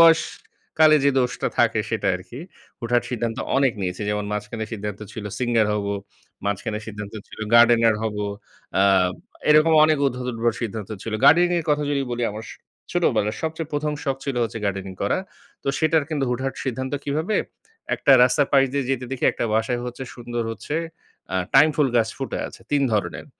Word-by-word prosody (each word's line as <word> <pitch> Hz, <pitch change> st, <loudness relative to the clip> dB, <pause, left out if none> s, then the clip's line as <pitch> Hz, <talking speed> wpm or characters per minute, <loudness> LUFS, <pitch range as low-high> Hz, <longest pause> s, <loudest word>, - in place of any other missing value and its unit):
বয়সকালে 160 Hz, -1 st, +3 dB
যে 140 Hz, -, +5 dB
দোষটা 125 Hz, -1 st, 0 dB
থাকে -, -, +3 dB
সেটা -, -, -1 dB
আরকি। 115 Hz, +9 st, -10 dB, 0.4 s
হুটহাট 120 Hz, +1 st, +1 dB
সিদ্ধান্ত 115 Hz, -2 st, -2 dB, 0.2 s
অনেক 135 Hz, -2 st, +3 dB
নিয়েছি 90 Hz, +2 st, -3 dB
যেমন, 105 Hz, 0 st, -1 dB
মাঝখানে 105 Hz, +2 st, -4 dB
সিদ্ধান্ত 105 Hz, -2 st, -5 dB
ছিল 110 Hz, -, -7 dB
সিঙ্গার 120 Hz, -3 st, +2 dB
হব, 105 Hz, -1 st, -2 dB, 0.6 s
মাঝখানে 100 Hz, +1 st, -2 dB
সিদ্ধান্ত 105 Hz, -1 st, -7 dB
ছিল -, -, -13 dB, 0.2 s
গার্ডেনার 115 Hz, -1 st, +6 dB
হব 110 Hz, -2 st, -2 dB, 0.6 s
আ -, -, +5 dB, 0.7 s
এরকম 155 Hz, +2 st, +6 dB
অনেক 155 Hz, -2 st, +3 dB
উদ্ভট, 125 Hz, -1 st, -3 dB
উদ্ভট 115 Hz, 0 st, 0 dB
সিদ্ধান্ত 110 Hz, -2 st, -4 dB
ছিল। 115 Hz, -, -5 dB
গার্ডেনিং 175 Hz, +1 st, +6 dB
এর -, -, -9 dB
কথা 150 Hz, 0 st, +2 dB
যদি 140 Hz, -1 st, +1 dB
বলি, 120 Hz, 0 st, -1 dB
আমার 110 Hz, +1 st, -7 dB
স -, -, -8 dB, 0.4 s
ছোটবেলার 110 Hz, -12 st, +1 dB
সবচেয়ে 160 Hz, 0 st, -3 dB
১ম 150 Hz, +1 st, -1 dB, 0.3 s
ছিল 140 Hz, -3 st, -3 dB
হচ্ছে 115 Hz, 0 st, -5 dB
গার্ডেনিং 95 Hz, -1 st, -3 dB
করা। -, -, +1 dB, 0.4 s
তো -, -, -3 dB
সেটার 160 Hz, -1 st, +2 dB
কিন্তু 145 Hz, -3 st, 0 dB
হুটহাট 130 Hz, +2 st, -2 dB
সিদ্ধান্ত 130 Hz, +1 st, -3 dB
কীভাবে, 155 Hz, +9 st, -1 dB, 0.6 s
একটা 140 Hz, -, +4 dB
রাস্তার 135 Hz, +3 st, +3 dB
পাশ 135 Hz, -1 st, +6 dB
দিয়ে 140 Hz, -2 st, 0 dB
যেতে 130 Hz, -1 st, -1 dB
দেখি 130 Hz, -, -2 dB
একটা -, -, -3 dB
বাসায় 115 Hz, +2 st, 0 dB
হচ্ছে 125 Hz, +2 st, -6 dB
সুন্দর 120 Hz, -1 st, -4 dB
হচ্ছে 130 Hz, +6 st, -6 dB, 0.6 s
আ -, -, +2 dB, 0.2 s
টাইম 150 Hz, +3 st, +8 dB
ফুল 145 Hz, -3 st, +3 dB
গাছ 115 Hz, -1 st, +3 dB
ফুটে 135 Hz, -, -3 dB
আছে -, -, -14 dB
৩ 145 Hz, -1 st, +3 dB
ধরনের। 105 Hz, -2 st, -2 dB
120 Hz, 170 wpm, -23 LUFS, 110-145 Hz, 0.7 s, টাইম